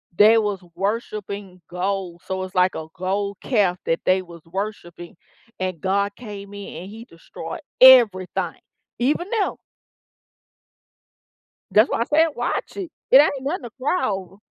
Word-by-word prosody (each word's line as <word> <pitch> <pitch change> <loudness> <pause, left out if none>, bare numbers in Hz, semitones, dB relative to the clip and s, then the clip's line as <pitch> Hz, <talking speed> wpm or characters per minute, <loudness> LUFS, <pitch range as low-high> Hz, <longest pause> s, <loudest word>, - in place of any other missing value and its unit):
they 215 +3 +7
was 205 -4 -1
worshiping 200 -1 -4
gold, 180 -1 -3
so, 190 0 -3
it's 185 +1 -8
like 180 0 +3
a 160 0 -5
gold 200 +2 -2
calf 195 -8 +1
that 165 - 0
they 185 0 +3
was 170 -2 -13
worshiping, 175 -2 -6 0.4
and 185 -3 -3
God 200 +1 0
came 205 -4 -9
in, 200 -4 -8
and 190 - -9
he 225 +2 -10
destroyed 165 - -9 0.2
everything, 230 -8 +6 0.4
even 300 +9 0
them. 440 -4 0 2.2
That's 215 +4 +5
why - - 0
I - - +1
said 315 +4 +3
watch 240 +10 -3
it, 370 -5 -5 0.2
it 260 - +8
ain't 285 -3 +1
nothing 285 +1 -3
to 240 - -7
cry 295 +4 +1
over. 190 -2 -5
200 Hz, 150 wpm, -22 LUFS, 185-235 Hz, 2.2 s, it